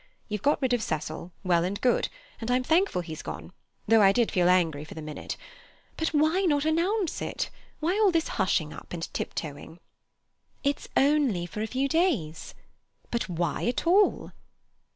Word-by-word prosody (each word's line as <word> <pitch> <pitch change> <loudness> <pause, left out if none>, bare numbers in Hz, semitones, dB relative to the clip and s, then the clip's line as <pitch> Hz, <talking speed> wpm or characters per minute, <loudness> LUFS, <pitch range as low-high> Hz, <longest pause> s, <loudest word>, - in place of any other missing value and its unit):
You've 210 -2 -3
got 290 - +2
rid 255 -1 +2
of 245 - +2
Cecil—well 170 +1 -1
and 190 +3 -2
good, 250 - +2 0.3
and 225 - -5
I'm 250 +1 +2
thankful 320 - +2
he's 160 -1 -7
gone, - - -7 0.3
though 225 0 +6
I 195 -1 +7
did 235 +2 +2
feel 180 -3 +3
angry 165 -5 +2
for 155 - -11
the 160 - -6
minute. 150 -1 -6 0.6
But 320 - -1
why 315 +4 +2
not 300 -6 +2
announce 345 +4 +1
it? - - -3 0.3
Why 390 +6 +3
this 330 -2 +1
hushing 175 -6 0
up - - -11
and 170 -1 -3
tip - - -4
toeing?" 155 +1 -6 0.9
"It's 280 0 -1
only 275 -11 +3
for 195 +5 -6
a 220 - -1
few 260 +4 0
days." 275 - 0 0.6
"But 235 -4 -1
why 170 +2 -1
at 245 - -1
all?" 390 +5 +3
225 Hz, 170 wpm, -27 LUFS, -, 0.9 s, I